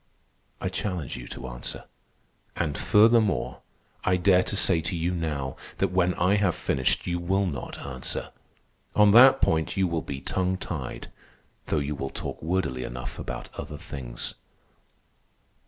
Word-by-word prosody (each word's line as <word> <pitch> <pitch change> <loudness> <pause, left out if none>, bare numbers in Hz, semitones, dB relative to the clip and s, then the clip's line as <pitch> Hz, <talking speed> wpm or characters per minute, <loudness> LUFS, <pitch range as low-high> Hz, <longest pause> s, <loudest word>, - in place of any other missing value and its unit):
I - - -2
challenge 90 -5 -3
you - - -7
to 65 - -7
answer. - - -6 0.7
And 75 -4 -1
furthermore, 110 -3 +3 0.4
I 90 0 +3
dare 90 0 +5
to 100 - -2
say 90 -4 +3
to 80 +3 -2
you 85 +2 0
now 75 -6 -3 0.2
that - - +1
when 90 -1 +2
I 95 +4 +3
have 95 -5 +2
finished 65 -2 0
you 85 0 -1
will 95 +3 +1
not 70 -9 -4
answer. 65 -2 -4 0.6
On 105 -1 +6
that 130 +5 +8
point 80 +2 +1
you 95 -1 +3
will 85 -2 -1
be 70 -3 -5
tongue 95 +5 0
tied, 70 -9 -6 0.6
though - - +1
you 75 0 -1
will 70 -1 -4
talk - - -6
wordily 80 -7 -1
enough 60 +1 -6
about - - -5
other 75 - -6
things. 70 -7 -6
85 Hz, 155 wpm, -27 LUFS, 70-95 Hz, 0.7 s, that